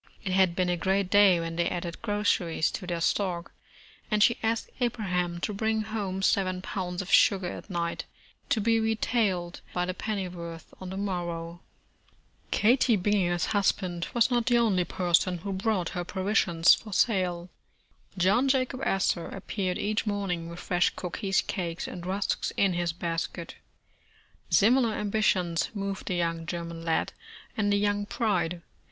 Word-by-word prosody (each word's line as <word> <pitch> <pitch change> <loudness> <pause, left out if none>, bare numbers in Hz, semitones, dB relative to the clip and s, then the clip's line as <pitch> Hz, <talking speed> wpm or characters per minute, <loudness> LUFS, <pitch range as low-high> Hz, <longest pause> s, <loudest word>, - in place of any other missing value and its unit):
It 190 - -2
had 185 -2 +3
been 185 0 +1
a 175 - +2
great 190 +1 0
day 200 -4 +6
when 165 0 -4
they 170 0 +1
added 175 -1 -5
groceries 205 -7 +1
to 185 - -6
their 170 -1 -2
stock, 175 -2 0 0.6
and 210 -1 +3
she 235 - +3
asked 225 0 -1
Abraham 180 -8 -1
to 210 - -2
bring 220 +1 0
home 200 -3 -3
seven 185 -2 +1
pounds 180 -1 -3
of 185 - -8
sugar 195 -3 +5
at - - -9
night, 170 -2 -2 0.4
to 225 - +2
be 225 +2 +2
retailed 220 -5 0
by 180 0 +1
the 185 - -2
pennyworth 180 -5 -5
on 185 - -6
the 190 - -5
mor 185 -3 -2
row. 170 0 -6 0.9
Katie 235 0 +3
Bininger's 180 -3 +1
husband 185 -4 0
was 240 +1 +2
not 240 -1 +1
the 240 -1 +4
only 200 -7 +2
person 175 +1 +1
who 195 +4 -5
brought 190 -3 0
her 175 -2 -3
provisions 185 -3 +3
for 215 - -4
sale. 180 -5 +1 0.7
John 200 +9 +3
Jacob 260 -1 +1
Astor 190 -5 +1
appeared 190 -1 -3
each 215 +2 -1
morning 185 -5 -2
with 170 - -8
fresh 180 -1 +2
cookies, 195 +2 -1
cakes 170 -3 -4
and 175 -1 -7
rusks 195 +2 -1
in 195 -2 +3
his 175 -1 0
basket. 170 0 -4 1.0
Similar 235 +2 +4
ambitions 200 -5 +1
moved 195 -1 -4
the 185 - -1
young 165 -1 -1
German 170 -1 -5
lad 165 -1 0 0.4
and 205 -3 +1
the 200 - +3
young 205 0 +1
bride. 190 -7 -1
185 Hz, 160 wpm, -28 LUFS, 175-210 Hz, 1.0 s, day